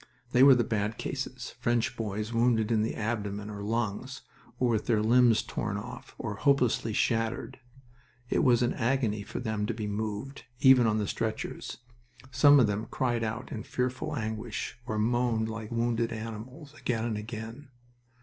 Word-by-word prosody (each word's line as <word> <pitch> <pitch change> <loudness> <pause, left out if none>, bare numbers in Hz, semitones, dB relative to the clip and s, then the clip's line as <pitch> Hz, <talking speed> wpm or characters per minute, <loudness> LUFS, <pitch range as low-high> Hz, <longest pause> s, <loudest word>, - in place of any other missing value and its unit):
They 125 - +4
were 135 -1 +9
the 120 - +2
bad 110 0 -1
cases 130 -2 -5
French 120 0 +1
boys 110 0 -3
wounded 115 -1 +2
in 110 -2 +3
the 110 - -1
abdomen 105 -2 -3
or 100 -1 -6
lungs, 115 +5 -2 0.3
or 125 - +2
with 110 -2 0
their 115 -3 +3
limbs 120 0 +5
torn 105 -2 -3
off, 115 +5 -9
or 105 -5 -4
hopelessly 125 -5 +2
shattered. 115 +3 -1 0.7
It - - +1
was 125 -1 +4
an 120 - +1
agony 115 -4 0
for - - -6
them 110 -3 -2
to 115 - -2
be 110 -2 -4
moved, 105 +6 -4
even 130 -3 +7
on 110 -1 +2
the 105 -2 -1
stretchers. 110 +1 -3 0.5
Some 145 +1 +7
of 125 - +6
them 105 +1 -2
cried 120 -3 0
out 110 +3 -4
in - - -4
fearful 130 +4 -2
anguish, 110 -2 -4
or 110 - -2
moaned 115 0 +1
like 110 -1 -6
wounded 115 0 0
animals, 115 +7 -7
again 120 -6 -2
and 115 -2 -1
again. 115 +5 -7
115 Hz, 170 wpm, -29 LUFS, 110-125 Hz, 0.7 s, were